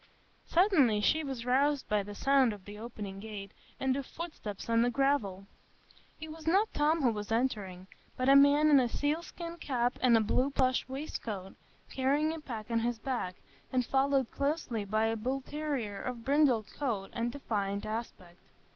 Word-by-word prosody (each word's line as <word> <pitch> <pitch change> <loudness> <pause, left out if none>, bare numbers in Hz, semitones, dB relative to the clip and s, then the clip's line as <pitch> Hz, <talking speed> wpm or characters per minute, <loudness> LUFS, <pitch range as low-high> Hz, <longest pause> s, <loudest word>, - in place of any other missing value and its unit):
Suddenly 320 - +4
she 315 +10 +2
was 265 -5 -5
roused 275 +3 +2
by 210 -1 +1
the 205 +1 -8
sound 270 -1 +3
of 200 -2 -12
the 205 +1 -9
opening 210 -4 -7
gate 205 -2 -7 0.3
and 265 -1 +1
of 275 -1 -4
footsteps 305 - -7
on 230 0 +3
the 240 - +3
gravel. 235 -7 0 0.7
It 315 0 -7
was 320 0 -11
not 390 +6 +3
Tom 305 +1 +2
who 245 - +4
was 210 0 -5
entering, 205 -7 -1 0.3
but 255 - 0
a 275 - +7
man 285 +2 +6
in 285 - +8
a 245 -2 +1
sealskin 335 +5 -3
cap 245 -6 -1
and 245 -3 +5
a - - +3
blue 250 +5 +1
plush 260 -2 +1
waistcoat, 225 -8 -5 0.4
carrying 285 +4 +1
a 325 - -6
pack 235 -6 -7
on 230 - +2
his 235 +1 -1
back, 220 -6 -3 0.4
and 255 -1 +1
followed 270 -1 +1
closely 280 -7 -2
by 215 +2 +1
a 225 0 0
bullterrier 265 -2 -3
of 240 -3 -5
brindled 275 -6 +3
coat 225 -9 -3
and 235 0 -1
defiant 205 -7 -3
aspect. 210 -5 -6
250 Hz, 175 wpm, -31 LUFS, 215-285 Hz, 0.7 s, in